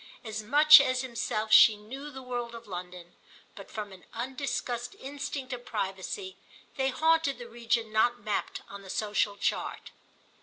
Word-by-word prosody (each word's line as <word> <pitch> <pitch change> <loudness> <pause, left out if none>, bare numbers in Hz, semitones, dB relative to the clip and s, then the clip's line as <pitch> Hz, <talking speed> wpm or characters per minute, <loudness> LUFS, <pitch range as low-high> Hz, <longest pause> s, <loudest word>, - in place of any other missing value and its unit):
As 220 -2 -4
much 295 +6 +8
as 255 -2 0
himself 220 -3 -2
she 215 -1 +8
knew 265 +8 -8
the 265 -2 -9
world 240 -2 -4
of 230 0 -10
London, 180 -2 -8 0.4
but - - -11
from 210 -2 -6
an 185 -1 -13
undiscussed 245 -1 -3
instinct 270 -1 -5
of 245 -1 -6
privacy 205 - -4 0.4
they 265 -1 +1
haunted 320 +1 +2
the 240 - -9
region 230 -1 -1
not 240 +2 +3
mapped 210 - -3
on 200 0 -9
the 195 - -13
social 205 0 0
chart. - - -2
235 Hz, 155 wpm, -29 LUFS, 210-265 Hz, 0.4 s, much